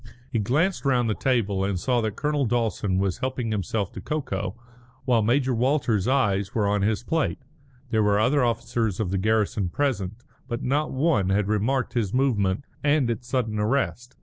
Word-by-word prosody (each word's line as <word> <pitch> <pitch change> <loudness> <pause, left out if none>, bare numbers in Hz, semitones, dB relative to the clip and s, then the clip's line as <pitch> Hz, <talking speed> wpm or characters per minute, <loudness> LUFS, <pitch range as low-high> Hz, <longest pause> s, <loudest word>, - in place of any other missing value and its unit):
He 115 - 0
glanced 150 - +1
round 125 -4 +2
the 110 - +1
table 105 -7 0
and 95 -2 -1
saw 125 +4 +1
that 110 -2 -2
Colonel 145 -1 0
Dawson 110 -5 0
was 95 -2 0
helping 130 -3 -2
himself 100 -1 -2
to - - -7
cocoa, 105 -11 -3 0.5
while 120 -3 +3
Major 130 +4 +2
Walters's 120 -4 +1
eyes 100 -7 +1
were 105 -3 +2
on 105 0 +1
his 105 +2 0
plate. 160 +4 0 0.5
There 110 -2 +3
were 105 -1 +3
other 125 +5 +3
officers 115 -3 -1
of 100 -5 -1
the 95 - 0
garrison 105 -2 +1
present, 110 -5 -1 0.3
but 120 -1 -4
not 145 +4 0
one 130 - +1
had 100 +1 +1
remarked 115 +5 0
his 115 -3 -1
movement 110 -6 +1 0.2
and 145 -4 +3
its 120 +1 -5
sudden 115 -4 -1
arrest. 120 +2 -1
115 Hz, 175 wpm, -25 LUFS, 100-130 Hz, 0.5 s, while